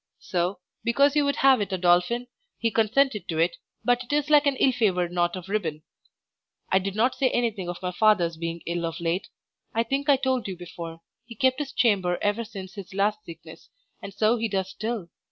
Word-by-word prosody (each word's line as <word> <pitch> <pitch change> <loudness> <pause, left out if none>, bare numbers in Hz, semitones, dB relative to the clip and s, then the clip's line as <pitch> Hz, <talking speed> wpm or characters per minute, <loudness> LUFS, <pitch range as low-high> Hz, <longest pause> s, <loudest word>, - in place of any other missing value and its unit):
So, 180 +1 -2 0.3
because 280 +5 +3
you 295 - +4
would 280 - +1
have 265 -4 +5
it 200 - -3
a 190 - 0
dolphin, 180 +7 +2 0.3
he 230 -1 0
consented 225 -1 +2
to 160 - -3
it, 170 +1 +1 0.3
but 245 0 +2
it 250 - -9
is 295 0 0
like 295 -1 +6
an 280 - +2
ill 265 - +3
favoured 185 -8 +1
knot 175 0 0
of 185 -1 -8
ribbon. 165 -7 -2 0.9
I 190 - +5
did 195 +1 -4
not 240 +4 +2
say 265 -2 +1
anything 220 -8 -1
of 175 - -4
my 180 - -1
father's 180 -4 +3
being 165 +1 -5
ill 170 0 -2
of 165 0 -6
late; 170 +2 -1 0.5
I 230 - +3
think 275 +5 -2
I 285 - +7
told 260 -4 0
you 190 -2 -5
before, 170 -2 -8 0.3
he 235 - -10
kept 260 +4 +2
his 285 -2 -3
chamber 195 -9 +2
ever 205 +3 0
since 195 -4 -9
his 195 -2 -9
last 210 +2 +1
sickness, 165 -1 -12 0.3
and 200 - -7
so 215 +4 +2
he 230 0 -1
does 190 -2 -2
still. 215 -4 -4
205 Hz, 210 wpm, -26 LUFS, 175-245 Hz, 0.9 s, I